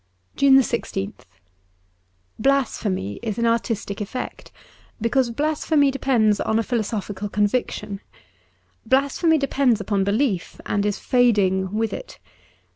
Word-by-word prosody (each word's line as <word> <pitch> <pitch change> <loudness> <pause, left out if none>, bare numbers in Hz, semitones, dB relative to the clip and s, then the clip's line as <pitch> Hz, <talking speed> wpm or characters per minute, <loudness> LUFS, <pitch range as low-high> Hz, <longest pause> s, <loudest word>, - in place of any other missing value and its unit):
^ - - -36
JUNE 275 -1 +5
1 270 - +7
6th 200 -4 -4 1.1
BLASPHEMY,;, 215 - 0
is 220 -2 -3
an 235 - +1
artistic 230 -3 -1
effect, 230 +5 -6 0.5
because 240 +2 +1
blasphemy 295 +2 +1
depends 240 -6 +2
on 220 - +1
a 225 - +1
philosophical 210 -3 -3
con 210 +1 +2
viction. 210 -3 -2 0.8
Blasphemy 280 +5 +2
depends 275 -5 +2
upon 200 -1 0
belief, 200 -2 -1
and 205 0 0
is 205 - -1
fading 200 -7 +2
with 225 0 0
it. - - -8
225 Hz, 120 wpm, -22 LUFS, 205-265 Hz, 1.1 s, 1